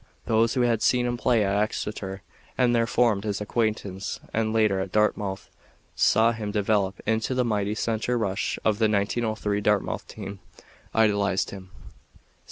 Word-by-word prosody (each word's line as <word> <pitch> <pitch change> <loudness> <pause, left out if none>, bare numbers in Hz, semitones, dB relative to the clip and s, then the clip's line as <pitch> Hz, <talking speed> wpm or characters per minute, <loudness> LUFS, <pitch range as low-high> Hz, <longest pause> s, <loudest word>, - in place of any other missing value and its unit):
Those 115 +2 +2
who 125 - +2
had 115 -2 +2
seen 125 -1 +3
him 120 0 -1
play 120 -3 +2
at 100 +1 0
Exeter 100 -3 -4 0.3
and 125 -1 +3
there 115 -1 +2
formed 115 -4 +2
his 105 -2 -2
acquaintance 105 -3 -2
and 110 -1 0
later 110 -3 +2
at 95 -1 -4
Dartmouth 105 -2 0 0.5
saw 115 +1 +4
him 110 -2 -4
develop 100 -2 0
into 110 +4 0
the 125 -1 +1
mighty 105 -2 0
center 115 +2 -1
rush 100 -3 -1
of 110 -1 +2
the 110 -1 +3
1903 105 0 0
Dartmouth 105 -1 0
team, 100 -1 -8 0.6
idolized 100 -3 +2
him. 95 -2 -10
105 Hz, 155 wpm, -25 LUFS, 100-115 Hz, 0.6 s, saw